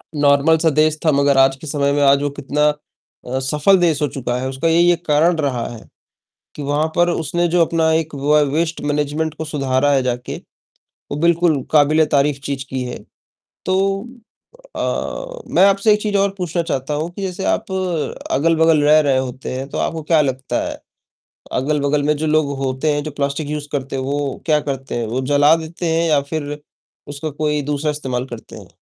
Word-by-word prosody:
Normal 145 Hz, +2 st, +4 dB
-सा 160 Hz, 0 st, +2 dB
देश 155 Hz, +1 st, +2 dB
था 155 Hz, -, +5 dB
मगर 140 Hz, -1 st, +3 dB
आज 135 Hz, 0 st, +5 dB
के 155 Hz, +3 st, -11 dB
समय 140 Hz, -1 st, 0 dB
में 145 Hz, -, +1 dB
आज 140 Hz, 0 st, +5 dB
वो 145 Hz, -, 0 dB
कितना 150 Hz, +2 st, +2 dB, 0.6 s
अ, 130 Hz, +2 st, -2 dB
सफल 150 Hz, +8 st, +3 dB
देश 165 Hz, -4 st, +1 dB
हो 150 Hz, -, +2 dB
चुका 125 Hz, -3 st, -3 dB
है। 130 Hz, -, -3 dB
उसका 135 Hz, +5 st, -2 dB
यही 170 Hz, +2 st, +4 dB
एक 175 Hz, 0 st, -2 dB
कारण 160 Hz, +3 st, +3 dB
रहा 130 Hz, -6 st, -1 dB
है 115 Hz, -, -9 dB, 0.8 s
कि 145 Hz, -, -7 dB
वहाँ 145 Hz, +2 st, 0 dB
पर 175 Hz, 0 st, +4 dB
उसने 175 Hz, +2 st, -1 dB
जो 175 Hz, +1 st, +2 dB
अपना 160 Hz, -1 st, +1 dB
एक 160 Hz, -2 st, -1 dB
व 145 Hz, +2 st, +2 dB
वेस्ट 165 Hz, +1 st, -1 dB
मैनेजमेंट 150 Hz, +2 st, -1 dB
को 160 Hz, -, -5 dB
सुधारा 140 Hz, -2 st, 0 dB
है, 135 Hz, -2 st, +3 dB
जाके, 125 Hz, -1 st, -3 dB, 0.8 s
वो -, -, -2 dB
बिल्कुल 170 Hz, -4 st, +3 dB
काबिले 155 Hz, +1 st, +4 dB
तारीफ़ 140 Hz, 0 st, +2 dB
चीज़ 135 Hz, -2 st, -3 dB
की 130 Hz, -1 st, -3 dB
है। 125 Hz, -, -5 dB, 0.7 s
तो 185 Hz, 0 st, +2 dB, 1.0 s
अ, -, -, -4 dB
मैं 185 Hz, -, +6 dB
आपसे 200 Hz, +2 st, +3 dB
एक 210 Hz, -, -2 dB
चीज़ 205 Hz, -2 st, 0 dB
और 200 Hz, 0 st, +2 dB
पूछना 175 Hz, -1 st, -1 dB
चाहता 150 Hz, -3 st, -3 dB
हूँ 160 Hz, +4 st, -2 dB
कि 195 Hz, +3 st, -8 dB
जैसे 190 Hz, 0 st, -4 dB
आप 220 Hz, -1 st, -3 dB, 0.6 s
अगल-बगल 160 Hz, +1 st, +3 dB
रह 155 Hz, +1 st, +6 dB
रहे 135 Hz, -3 st, +2 dB
होते 130 Hz, 0 st, -4 dB
हैं, 135 Hz, +2 st, -5 dB
तो -, -, -5 dB
आपको 160 Hz, 0 st, -2 dB
क्या 155 Hz, 0 st, +3 dB
लगता 130 Hz, -1 st, -2 dB
है -, -, -7 dB, 0.8 s
अगल-बगल 145 Hz, 0 st, 0 dB
में 150 Hz, +1 st, +2 dB
जो 155 Hz, +1 st, -2 dB
लोग 150 Hz, -2 st, +1 dB
होते 135 Hz, +3 st, 0 dB
हैं 145 Hz, 0 st, -2 dB
जो 155 Hz, -, -5 dB
प्लास्टिक 145 Hz, +1 st, -3 dB
यूज़ 150 Hz, -1 st, -4 dB
करते 135 Hz, -1 st, -3 dB
हैं 130 Hz, -, -2 dB
वो 140 Hz, 0 st, -3 dB
क्या 155 Hz, -2 st, +3 dB
करते 135 Hz, -1 st, -4 dB
हैं? 115 Hz, -2 st, -2 dB
वो 125 Hz, +4 st, -2 dB
जला 145 Hz, +3 st, +6 dB
देते 165 Hz, +1 st, -5 dB
हैं 165 Hz, 0 st, +1 dB
या 145 Hz, -2 st, +3 dB
फिर 150 Hz, -2 st, -3 dB, 0.5 s
उसका 145 Hz, +2 st, -5 dB
कोई 150 Hz, 0 st, -1 dB
दूसरा 150 Hz, +1 st, 0 dB
इस्तेमाल 130 Hz, -4 st, -3 dB
करते -, -, -13 dB
हैं। -, -, -12 dB
150 Hz, 200 wpm, -19 LUFS, 140-160 Hz, 1.0 s, मैं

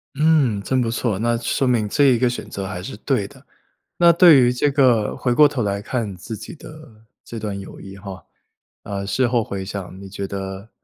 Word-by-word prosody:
嗯， 145 Hz, -8 st, +3 dB
真 130 Hz, +3 st, 0 dB
不 115 Hz, -, 0 dB
错， 115 Hz, -4 st, -1 dB
那 120 Hz, +1 st, +1 dB
说 120 Hz, +3 st, -1 dB
明 115 Hz, -4 st, +1 dB
这 145 Hz, +7 st, +2 dB
一 125 Hz, -3 st, +4 dB
个 125 Hz, -, +2 dB
选 125 Hz, -, -6 dB
择 100 Hz, -1 st, -5 dB
还 90 Hz, -2 st, -6 dB
是 -, -, -7 dB
对 -, -, -1 dB
的。 -, -, -18 dB, 0.5 s
那 170 Hz, -1 st, +6 dB
对 165 Hz, -4 st, +7 dB
于 125 Hz, 0 st, +3 dB
这 135 Hz, +4 st, +1 dB
个 125 Hz, -6 st, +2 dB
回 125 Hz, -2 st, 0 dB
过 150 Hz, +4 st, +7 dB
头 135 Hz, -4 st, -1 dB
来 100 Hz, 0 st, -2 dB
看 110 Hz, -4 st, -3 dB
自 110 Hz, +5 st, -7 dB
己 110 Hz, +8 st, -9 dB
的 155 Hz, -8 st, -14 dB, 0.2 s
这 115 Hz, -, -8 dB
段 105 Hz, -2 st, -4 dB
友 95 Hz, -, -11 dB
谊 95 Hz, 0 st, -10 dB
哈， 95 Hz, -1 st, -9 dB, 0.6 s
呃， 100 Hz, -1 st, -4 dB
事 130 Hz, +5 st, +1 dB
后 120 Hz, -2 st, +1 dB
回 100 Hz, -2 st, -5 dB
想 95 Hz, -1 st, -7 dB
你 100 Hz, -, -9 dB
觉 100 Hz, 0 st, -5 dB
得 95 Hz, +2 st, -7 dB
115 Hz, 230 characters per minute, -21 LUFS, 100-130 Hz, 0.6 s, 对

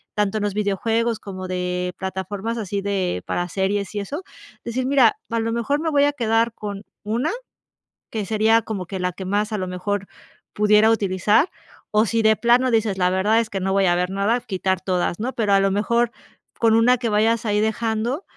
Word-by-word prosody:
tanto 210 Hz, 0 st, 0 dB
en 210 Hz, -, -2 dB
los 205 Hz, -, -1 dB
videojuegos 220 Hz, +3 st, 0 dB
como 185 Hz, -2 st, -7 dB
de 180 Hz, 0 st, -2 dB
plataformas 190 Hz, +4 st, -4 dB
así 200 Hz, -1 st, -3 dB
de, 190 Hz, -, -1 dB
para 175 Hz, 0 st, -2 dB
series 200 Hz, +2 st, -1 dB
y 205 Hz, -, -1 dB
eso, 290 Hz, -, -5 dB, 0.4 s
decir, 250 Hz, +2 st, -2 dB
mira, 260 Hz, -5 st, +4 dB
a 230 Hz, -, 0 dB
lo 225 Hz, 0 st, -1 dB
mejor 255 Hz, +5 st, 0 dB
me 325 Hz, -, 0 dB
voy 285 Hz, -2 st, +3 dB
a 290 Hz, -, +1 dB
quedar 230 Hz, -3 st, +1 dB
con 205 Hz, -2 st, -6 dB, 0.2 s
1 230 Hz, -, -1 dB, 0.8 s
que 220 Hz, -2 st, -2 dB
sería 220 Hz, +2 st, +3 dB
como 200 Hz, -4 st, -5 dB
que 190 Hz, -2 st, -5 dB
la 180 Hz, 0 st, -1 dB
que 190 Hz, +2 st, -7 dB
más 205 Hz, +3 st, 0 dB
a 215 Hz, -, 0 dB
lo 185 Hz, -1 st, -3 dB
mejor 195 Hz, +2 st, -3 dB, 0.5 s
pudiera 210 Hz, +1 st, +4 dB
utilizar. 205 Hz, -, +2 dB, 0.4 s
O 215 Hz, +1 st, +3 dB
si 225 Hz, +2 st, 0 dB
de 220 Hz, 0 st, +4 dB
plano 245 Hz, +2 st, +3 dB
dices: 220 Hz, -4 st, +1 dB
"La 180 Hz, -1 st, +2 dB
verdad 205 Hz, +5 st, +2 dB
es 225 Hz, -, -5 dB
que 195 Hz, -, -3 dB
no 190 Hz, +1 st, -1 dB
voy 195 Hz, -1 st, +3 dB
a 175 Hz, -, +3 dB
ver 180 Hz, +1 st, 0 dB
nada", 200 Hz, +5 st, +1 dB
quitar 190 Hz, -3 st, -1 dB
todas, 180 Hz, -1 st, -1 dB
¿no? 255 Hz, +4 st, -2 dB
Pero 215 Hz, -3 st, 0 dB
a 195 Hz, -, +6 dB
lo 195 Hz, 0 st, +2 dB
mejor 235 Hz, +4 st, +1 dB, 0.5 s
con 225 Hz, -1 st, +4 dB
una 245 Hz, +3 st, +5 dB
que 235 Hz, -2 st, -2 dB
vayas 220 Hz, +2 st, +2 dB
ahí 210 Hz, -1 st, +1 dB
dejando 225 Hz, -, -1 dB
210 Hz, 205 wpm, -22 LUFS, 190-230 Hz, 0.8 s, a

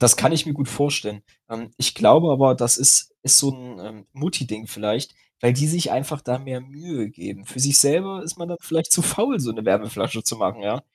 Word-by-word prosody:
Das 120 Hz, -1 st, +7 dB
kann -, -, +1 dB
ich 160 Hz, 0 st, -1 dB
mir 150 Hz, -, -4 dB
gut 140 Hz, -3 st, -5 dB
vorstellen. 140 Hz, -8 st, -3 dB, 0.3 s
Ähm, 115 Hz, -1 st, -11 dB
ich 130 Hz, -, -1 dB
glaube 160 Hz, 0 st, +5 dB
aber, 135 Hz, -1 st, +3 dB
das 120 Hz, 0 st, +3 dB
ist 135 Hz, -, +5 dB
ist 135 Hz, -, +8 dB
so 140 Hz, -1 st, +2 dB
'n, 125 Hz, -2 st, -14 dB
ähm, 105 Hz, -2 st, -16 dB
Mutti-Ding 135 Hz, -, -6 dB
vielleicht, 105 Hz, +5 st, -5 dB, 0.3 s
weil 120 Hz, 0 st, +2 dB
die 140 Hz, +4 st, -1 dB
sich 170 Hz, +2 st, -2 dB
einfach 145 Hz, +2 st, -4 dB
da 125 Hz, -1 st, -4 dB
mehr 130 Hz, -2 st, -9 dB
Mühe 135 Hz, -4 st, -9 dB
geben. 100 Hz, -2 st, -13 dB
Für 130 Hz, -, -12 dB
sich 140 Hz, +1 st, +5 dB
selber 180 Hz, +7 st, +1 dB
ist 165 Hz, +3 st, -9 dB
man 170 Hz, 0 st, -9 dB
da 175 Hz, -, -7 dB
vielleicht 160 Hz, 0 st, -2 dB
zu 175 Hz, -, +4 dB
faul, 230 Hz, +7 st, -1 dB
so 120 Hz, -, -4 dB
'ne 110 Hz, 0 st, -9 dB
Wärmeflasche 110 Hz, +2 st, -3 dB
zu -, -, -2 dB
machen, -, -, -4 dB
ja? -, -, -4 dB
135 Hz, 225 wpm, -20 LUFS, 115-155 Hz, 0.3 s, ist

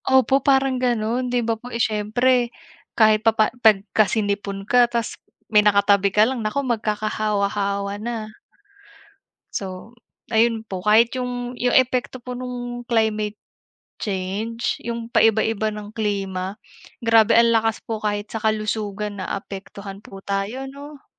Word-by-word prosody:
Opo, 265 Hz, +1 st, +4 dB
parang 270 Hz, -1 st, +2 dB
gano'n. 240 Hz, 0 st, 0 dB
'Di 245 Hz, -1 st, 0 dB
ba 230 Hz, -, +1 dB
po, 245 Hz, -, -9 dB
eh, 235 Hz, -, -4 dB
syempre, 235 Hz, +3 st, +1 dB, 0.5 s
kahit 215 Hz, -1 st, +5 dB
pa 225 Hz, 0 st, +2 dB
pa 215 Hz, -, +3 dB
pagka 215 Hz, -1 st, +4 dB
sinipon 200 Hz, -2 st, -2 dB
ka 245 Hz, +2 st, +4 dB
tapos 235 Hz, -1 st, -2 dB, 0.4 s
may 210 Hz, -, +7 dB
nakatabi 200 Hz, -1 st, +4 dB
ka 210 Hz, +2 st, +4 dB
lang, 255 Hz, 0 st, -2 dB
naku, 220 Hz, +6 st, -1 dB
magkakahawa-hawa 205 Hz, -3 st, -1 dB
na. 220 Hz, -2 st, -5 dB, 1.2 s
So, 195 Hz, +4 st, -7 dB, 0.3 s
ayun 225 Hz, 0 st, +2 dB
po. 185 Hz, -1 st, -5 dB
Kahit 225 Hz, +4 st, +4 dB
yung 245 Hz, -1 st, -4 dB
yung 245 Hz, 0 st, 0 dB
epekto 255 Hz, 0 st, +2 dB
po 250 Hz, +1 st, -6 dB
nung 245 Hz, -1 st, -6 dB
climate 220 Hz, -2 st, 0 dB, 0.6 s
change, 205 Hz, +4 st, -3 dB
yung 235 Hz, 0 st, -5 dB
paiba-iba 220 Hz, -1 st, +3 dB
ng 210 Hz, 0 st, -7 dB
klima, 195 Hz, -3 st, -2 dB, 0.5 s
grabe 225 Hz, -2 st, +5 dB
ang 235 Hz, 0 st, +5 dB
lakas 225 Hz, -1 st, +1 dB
po 220 Hz, -2 st, -4 dB
kahit 205 Hz, 0 st, -3 dB
sa 225 Hz, -, -3 dB
kalusugan 210 Hz, -1 st, -2 dB
naapektuhan 195 Hz, +1 st, -7 dB
po 195 Hz, -2 st, -12 dB
tayo, 200 Hz, +7 st, -2 dB
'no? 280 Hz, +1 st, -10 dB
220 Hz, 135 wpm, -22 LUFS, 205-240 Hz, 1.2 s, may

